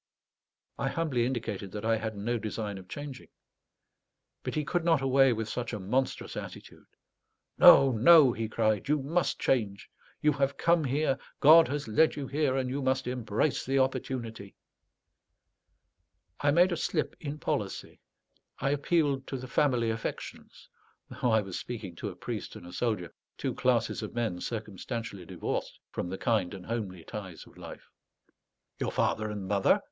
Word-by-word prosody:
I - - 0
humbly 135 -8 0
indicated 110 -6 -4
that 105 +1 -5
I 115 0 +3
had 110 -1 -4
no 115 +4 -1
design 105 -2 -4
of 95 - -14
changing. 145 0 -7 1.1
But - - -4
he 150 -1 -1
could 175 +2 0
not 165 -3 +3
away 135 0 +5
with 110 -1 -2
such 120 +1 -4
a 105 - -3
monstrous 125 +8 -1
attitude. - - -9 0.7
"No, 135 -1 +9
no," 130 +3 +7
he 110 -1 -3
cried; 110 -2 0
"you 150 - +4
must 165 +5 0
change. 105 -7 -1 0.3
You 150 - +3
have 140 0 0
come 170 -1 +3
here, 135 +1 0 0.2
God 160 +3 +8
has 145 -2 -3
led 155 +9 +3
you 145 - -4
here, 140 -1 0
and 130 -1 0
you 135 +3 -2
must 130 0 0
embrace 125 +2 -1
the 135 +1 0
opportunity." 120 -6 -2 1.8
I 145 - +2
made 175 +5 +5
a 170 - -1
slip 155 -1 -1
in 150 -1 -5
policy; - - -3 0.6
I 135 +2 0
appealed 145 -2 +1
to 135 - -4
the 130 0 -7
family 125 -4 +2
affections, 110 0 -6 0.4
though 125 - -1
I 110 -1 +4
was 95 -3 -5
speaking 110 -7 -6
to - - -4
a - - -9
priest - - -6
and - - -10
a 90 - -10
soldier, 105 -5 -2 0.2
two - - -2
classes 120 -3 +1
of 110 +2 -7
men 110 -7 -2
circumstantially 110 -3 -5
divorced - - -4
from 90 - -4
the 95 - -4
kind 105 -4 0
and 90 -2 -10
homely 100 -7 -4
ties 95 -4 -8
of - - -19
life. - - -10 0.9
"Your - - -1
father 110 0 0
and 100 -2 -5
mother?" 100 0 +3
120 Hz, 165 wpm, -29 LUFS, 105-140 Hz, 1.8 s, No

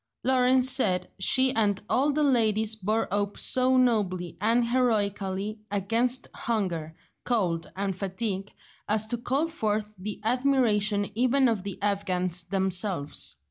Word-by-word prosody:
Lawrence 255 0 +3
said 195 -9 +2
she 260 +7 +3
and 205 -3 +1
all 275 +6 +2
the 300 +1 0
ladies 220 -5 +2
bore 215 +2 -1
up 205 0 -1
so 255 0 +2
nobly 200 -8 +1
and 230 +3 +2
heroically 210 -4 0
against 230 +6 +1
hunger, 175 -9 -3 0.3
cold, 180 -9 -1
and 195 -1 -2
fatigue, 195 +1 -3 0.4
as 215 0 +2
to 225 - -2
call 265 +6 -1
forth 215 -8 -2
the 205 +2 -5
admiration 225 -5 +2
even 255 +4 +3
of 225 -5 0
the 200 -1 -6
Afghans 185 -3 0
themselves. 185 - -1
215 Hz, 130 wpm, -27 LUFS, 195-245 Hz, 0.4 s, Lawrence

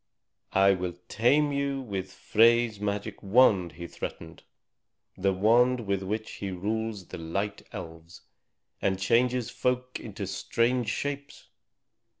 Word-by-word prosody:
"I 95 +1 +6
will 90 -2 -3
tame 145 +6 +3
you 140 -1 -1
with 95 -7 -5
Frey's 115 +2 +3
magic 105 0 -3
wand!" 100 -4 +4
he 85 - -8
threatened, 80 -1 -7 0.7
"the 95 +1 +1
wand 120 +6 +4
with 100 -1 0
which 110 +3 -3
he 100 - -4
rules 105 +1 -3
the - - -7
Light 100 +5 -3
Elves, 80 +1 -9 0.6
and 95 -1 +1
changes 120 +4 +2
folk 125 0 -1
into 105 -2 -6
strange 115 +5 0
shapes. 140 +5 -4
105 Hz, 125 wpm, -28 LUFS, 95-125 Hz, 0.7 s, I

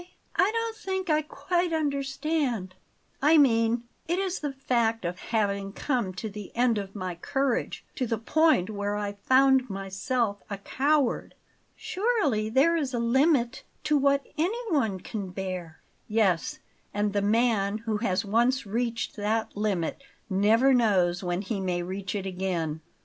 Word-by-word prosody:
"I 395 - +4
don't 455 0 -2
think 380 -4 -2
I 305 0 +3
quite 345 +4 -1
understand." 280 - -1 0.5
"I 305 +3 +6
mean, 230 -4 +4 0.2
it 345 +2 0
is 380 -1 -1
the 290 -2 -3
fact 235 -5 0
of 175 +1 -3
having 200 -3 0
come 245 -8 -1
to 220 - -4
the 205 -2 -8
end 235 -2 +3
of 195 0 -7
my 185 -3 -3
courage, 265 +9 -1
to 255 - 0
the 230 - 0
point 230 - +2
where 205 0 -2
I 205 -1 -2
found 260 +5 +3
myself 200 +3 -2
a 200 - -3
coward." 275 +5 0 0.4
"Surely 345 - 0
there 275 +8 +4
is 280 -6 -1
a - - 0
limit 265 +1 +2 0.2
to 300 0 +2
what 280 0 +3
anyone 320 - 0
can 200 -4 -5
bear." 180 -3 -5 0.3
"Yes; 205 -6 +1 0.4
and 205 0 0
the 205 - +1
man 210 -1 +2
who 220 -1 -2
has 200 -3 0
once 240 +5 +2
reached 230 +2 -2
that 215 +2 -1
limit 200 - -1 0.3
never 220 +8 +4
knows 190 -7 +2
when 180 +2 -1
he 205 0 -3
may 180 -2 -1
reach 190 +2 -4
it 195 -2 -3
again." 180 -4 -2
225 Hz, 150 wpm, -27 LUFS, 200-275 Hz, 0.5 s, I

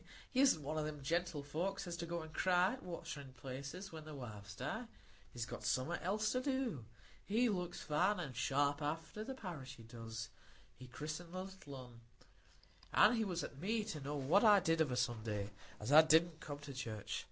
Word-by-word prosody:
He 260 - +1
isn't 265 - +5
one 155 +3 -1
o' - - 0
them 150 -2 -4
gentlefolks 170 +4 -1
as 175 -1 -3
go 170 0 -3
to - - -7
cry 180 +4 +3
at 260 - -7
waterin' 160 -6 -6
places 140 +9 -6
when 160 -1 -7
their 155 -1 -8
wives 105 -5 -7
die; 220 - -3 0.4
he's 120 -2 -3
got - - -7
summat 130 +11 0
else 210 +4 +1
to 255 - +1
do. 255 - -1 0.4
He 230 +4 +3
looks 180 -4 -2
fine 185 +7 +2
and 140 -8 -4
sharp 145 +4 +2
after 160 +7 -3
the 265 +4 -5
parish, 155 - -6
he 115 - -12
does. 115 -1 -6 0.5
He 130 - -11
christened 155 +6 -5
the 185 - -2
little 190 -7 -9
un; 125 -3 -10 0.9
an' 215 +4 +7
he 225 - +2
was 180 -4 -1
at 135 - -7
me 215 +6 +1
to 205 -8 -4
know 145 +2 -3
what 150 - +4
I 210 -3 +8
did 165 -2 +2
of 150 -5 +2
a 125 - 0
Sunday, 110 -4 -1 0.3
as 105 +5 -3
I 155 +2 +11
didn't 160 +1 +4
come 145 -2 -5
to 145 -1 -8
church. 110 -5 -3
155 Hz, 200 wpm, -38 LUFS, 130-185 Hz, 0.9 s, I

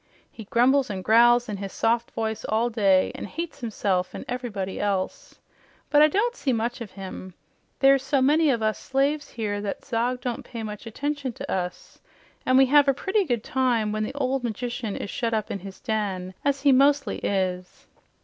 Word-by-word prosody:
He 220 - -10
grumbles 255 +5 +3
an' 190 -2 -4
growls 240 +3 +5
in 210 -2 -4
his 195 0 -6
soft 235 +1 0
voice 220 -1 -3
all 230 +3 +1
day, 195 -4 +3
an' - - -6
hates 330 -1 -6
himself 195 -5 -1
an' - - -7
everybody 215 -7 -4
else. 195 -2 -2 0.5
But 295 0 +6
I 305 - +8
don't 440 +10 0
see 270 - -1
much 235 +1 -2
of 225 - -6
him. 185 -1 -9 0.4
There's 275 0 +5
so 270 +1 +1
many 300 +4 +4
of 235 -4 +1
us 215 0 0
slaves 280 +2 0
here 205 -3 -3
that 205 -1 -5
Zog 245 0 -1
don't 245 -2 -3
pay 230 -2 -7
much 210 0 -7
attention 285 +2 -3
to - - -7
us, 180 -1 -4 0.5
an' 255 0 +5
we 270 - +7
have 290 +2 +5
a 275 - +3
pretty 390 +6 0
good 240 -7 -1
time 245 -5 +1
when 215 0 -2
the 215 +6 -3
ol' 270 -1 0
magician 240 -2 -4
is 200 - -5
shut 230 -2 -1
up 215 -2 -2
in 200 - -3
his 190 +1 -10
den, 195 -4 -2
as 280 -1 0
he 280 0 +5
mostly 275 +1 +3
is." 185 -2 -2
235 Hz, 195 wpm, -25 LUFS, 205-270 Hz, 0.5 s, I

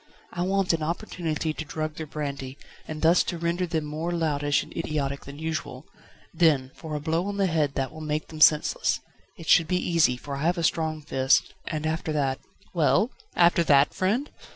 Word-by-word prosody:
I 175 - -4
want 190 0 +1
an 165 - -1
opportunity 160 -1 -2
to 155 - -5
drug 155 0 -4
their 160 - -5
brandy, 140 -3 -5 0.3
and 155 0 -6
thus 165 +2 +6
to 175 - -3
render 170 +2 -1
them 160 -2 -1
more 155 +3 -3
loutish 145 -4 +1
and - - -14
idiotic 145 -4 -2
than 140 +1 -9
usual; 155 -3 -4 0.5
then 155 -6 +3
for 155 -2 -7
a - - -1
blow 165 +5 -1
on 205 0 -3
the 200 - +2
head 155 -5 0
that 135 -1 -1
will 155 - -10
make 155 0 -3
them 155 -1 -8
senseless. 150 -1 +4 0.4
It 165 - -10
should 165 -2 +5
be 180 - +1
easy, 165 -8 +2
for 140 +2 -6
I - - -5
have 175 +4 +1
a 170 - -1
strong 160 -1 0
fist, 135 -1 +2
and 155 -1 -3
after 160 +1 -1
that 135 -2 0 0.2
..." 200 - -30
"Well? 180 - +3 0.2
After 170 0 +5
that, 140 -1 +5
friend?" 220 +10 0
155 Hz, 200 wpm, -26 LUFS, 145-170 Hz, 0.5 s, thus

